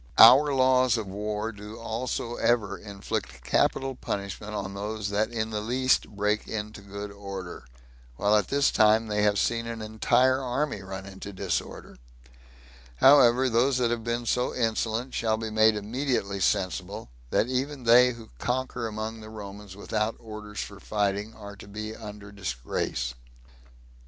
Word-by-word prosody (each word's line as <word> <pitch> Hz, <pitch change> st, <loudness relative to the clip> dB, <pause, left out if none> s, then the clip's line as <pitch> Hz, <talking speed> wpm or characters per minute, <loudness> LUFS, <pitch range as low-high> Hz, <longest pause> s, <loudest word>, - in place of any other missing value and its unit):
Our 135 Hz, +6 st, +9 dB
laws 130 Hz, -2 st, +4 dB
of 110 Hz, -, -3 dB
war 105 Hz, +3 st, -3 dB
do 105 Hz, +1 st, -10 dB
also 115 Hz, +1 st, -3 dB
ever 105 Hz, -5 st, +1 dB
inflict 95 Hz, -, -5 dB
capital 135 Hz, -, +1 dB
punishment 105 Hz, -2 st, -5 dB
on 100 Hz, -1 st, -4 dB
those 105 Hz, +1 st, -4 dB
that 105 Hz, +2 st, +1 dB
in 110 Hz, -2 st, -3 dB
the 105 Hz, -1 st, -2 dB
least 130 Hz, +4 st, +1 dB
break 105 Hz, +1 st, -1 dB
into 105 Hz, -1 st, -5 dB
good 100 Hz, +1 st, -7 dB
order, 100 Hz, -3 st, -8 dB, 0.5 s
while 105 Hz, -, +3 dB
at 105 Hz, -, +2 dB
this 140 Hz, 0 st, +2 dB
time 110 Hz, 0 st, +4 dB
they 105 Hz, -1 st, -1 dB
have 105 Hz, -1 st, +3 dB
seen 115 Hz, +3 st, 0 dB
an 115 Hz, -1 st, -5 dB
entire 125 Hz, +4 st, +2 dB
army 130 Hz, -3 st, -2 dB
run 95 Hz, 0 st, -7 dB
into 95 Hz, +1 st, -8 dB
disorder. 95 Hz, -9 st, -4 dB, 1.0 s
However, 130 Hz, -, +6 dB
those 125 Hz, +3 st, +3 dB
that 120 Hz, -2 st, +1 dB
have 115 Hz, -1 st, -2 dB
been 120 Hz, +1 st, -2 dB
so 125 Hz, +2 st, 0 dB
insolent 115 Hz, +1 st, -1 dB
shall 110 Hz, -1 st, +1 dB
be 110 Hz, 0 st, -4 dB
made 110 Hz, 0 st, +5 dB
immediately 105 Hz, -2 st, -2 dB
sensible, 95 Hz, -10 st, -1 dB, 0.2 s
that -, -, +2 dB
even 130 Hz, +2 st, -2 dB
they 125 Hz, +2 st, +6 dB
who 115 Hz, -1 st, -13 dB
conquer 125 Hz, -1 st, -2 dB
among 110 Hz, +1 st, -5 dB
the 110 Hz, 0 st, -10 dB
Romans 100 Hz, -2 st, -9 dB
without 105 Hz, +2 st, -2 dB
orders 105 Hz, -2 st, -7 dB
for 100 Hz, -1 st, -8 dB
fighting 105 Hz, +1 st, -1 dB
are 100 Hz, -1 st, -9 dB
to 100 Hz, -, -12 dB
be 110 Hz, +2 st, -6 dB
under 105 Hz, -2 st, -9 dB
disgrace." 65 Hz, -7 st, -3 dB
110 Hz, 155 wpm, -27 LUFS, 100-120 Hz, 1.0 s, Our